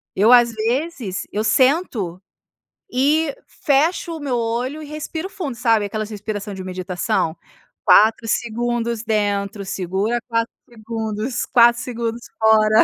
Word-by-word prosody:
Eu, 210 +5 +4
às 240 -1 +6
vezes 235 - -2
eu 210 - -1
sento 230 - +1 0.7
e 300 - +2
fecho 325 +4 0
o - - -9
meu 270 -5 -1
olho 240 +6 -2
e - - -7
respiro 310 +3 -5
fundo, 310 -10 -5
sabe, 230 -3 +2
aquelas 215 +1 -4
respiração 210 -1 -5
de 190 -1 -7
meditação? 180 -3 -2 0.5
4 220 +2 +5
segundos 235 0 -1
dentro. 205 -2 -1
Segura 195 +4 -1
4 230 -1 0 0.2
segundos, 225 +1 -4
4 240 -1 +5
segundos 235 -1 -4 0.2
fora. 220 0 +5
230 Hz, 125 wpm, -21 LUFS, 210-250 Hz, 0.7 s, às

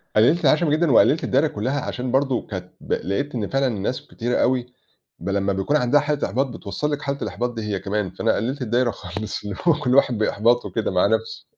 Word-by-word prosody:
قلّلت 150 +10 +4
العَشم 155 +3 +4
جدًا، 155 +1 +2
وقلّلت 145 +6 +5
الدايرة 140 +4 +2
كلّها، 130 +4 -2
عشان 125 -1 -4
برضه 135 -2 +1
كانت 90 -3 -6
ب - - -3
لقيت 130 +9 -2
إن 105 -4 -2
فعلًا 135 0 +1
الناس 110 +1 -3
كتيرة 120 +1 -2
أوي، 125 -1 +2 0.5
بل 100 +4 -3
لمّا 100 0 +1
بيكون 95 +10 +1
عنده 140 +2 +3
حالة 150 0 -1
إحباط، 135 +2 0
بتوصّل 125 +5 -4
لِك 145 0 -2
حالة 140 -1 -2
الإحباط 120 +3 -2
دي 115 - -5
هي 105 -2 -2
كمان، 100 0 -2
فأنا - - 0
قلّلت 130 +6 -2
الدايرة 120 +1 +1
خالص، 100 +2 -6
اللي 105 -1 -5
هو 170 - +7
كل 130 -4 0
واحد 125 -4 +4
بإحباطه 115 +3 +2
كده - - -1
مع - - +3
نفسه. 455 0 -1
125 Hz, 215 wpm, -22 LUFS, 105-140 Hz, 0.5 s, هو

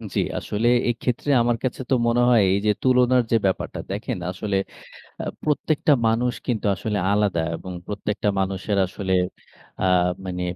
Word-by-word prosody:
জি, - - +2 0.2
আসলে 105 +3 -1 0.2
এইক্ষেত্রে 120 +3 -2
আমার 120 0 +1
কাছে 130 0 -2
তো 135 - +3
মনে 120 +1 +3
হয় 120 -3 +5
এইযে 100 +2 +2
তুলনার 125 -1 +4
যে, - - +4
ব্যাপারটা 95 - -1
দেখেন - - -3
আসলে 100 +1 -2 0.7
আ - - -3 0.2
প্রত্যেকটা 150 0 +1 0.2
মানুষ 120 +2 +1
কিন্তু 115 -4 -1
আসলে 105 +1 -2
আলাদা 100 -5 +1 0.2
এবং 95 - -8
প্রত্যেকটা 105 0 -2
মানুষের 95 +2 -1
আসলে 95 +1 -4 0.7
আ - - +2 0.4
মানে 90 -1 -3
110 Hz, 150 wpm, -23 LUFS, 100-125 Hz, 0.7 s, হয়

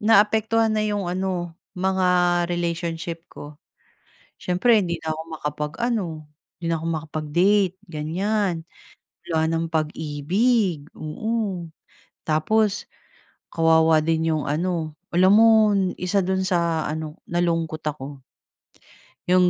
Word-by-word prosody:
naapektuhan 220 +1 +3
na 215 - +1
'yong 205 -3 -1
ano 180 -2 -2 0.2
mga 180 -2 +2
relationship 170 -1 -3
ko. 145 0 -10 0.8
Siyempre 210 +6 +3
'di 170 -1 -3
na 160 - -1
ako 160 - -5 0.2
makapag-ano, 180 +9 -2 0.5
'di 170 - -7
na - - +2
ako - - -5
makapag-date, 170 +5 +1
ganyan. 175 +3 -1 0.6
Wala 160 -1 +1
nang 165 0 -1
pag-ibig. 160 - 0
Oo, 195 +2 -3 0.6
tapos 200 +7 +1 0.7
kawawa 160 -1 +4
din 160 0 +1
'yong 150 - -2
ano 160 0 -1 0.2
alam 185 +2 +5
mo, 220 -1 +6 0.3
isa 180 +3 0
do'n 190 0 0
sa 170 -3 +1
ano, 155 0 -6
nalungkot 165 -2 0
ako, 145 -1 -4 1.1
yung 180 0 +5
175 Hz, 110 wpm, -23 LUFS, 160-195 Hz, 1.1 s, mo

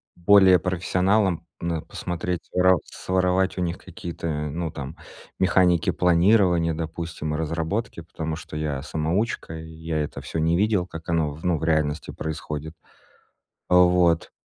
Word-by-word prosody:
более 95 0 +6
профессионалом, 90 +1 +1 0.2
но 85 -2 -2
посмотреть, 90 0 -4
ро 90 0 +5
своровать 95 +1 0
у 90 - -1
них 85 0 -2
какие-то, 85 -1 -7 0.2
ну, 80 +1 -3
там, 70 +4 -7 0.4
механики 90 -2 +3
планирования, 90 -1 +3
допустим, 80 -1 -4
разработки, 80 +6 -2
потому 80 -1 -5
что 75 - -8
я 75 -3 -2
самоучка, 80 +3 -2
и 80 0 -9
я 80 0 -4
это - - -6
всё 80 - -4
не 80 +2 +2
видел, 105 -2 +2
как 80 -2 -10
оно, 75 -3 0
ну, 90 -2 +1
в 75 - -7
реальности 80 -2 0
происходит, 80 0 -5 0.9
вот. 90 -2 +4
85 Hz, 135 wpm, -24 LUFS, 80-90 Hz, 0.9 s, более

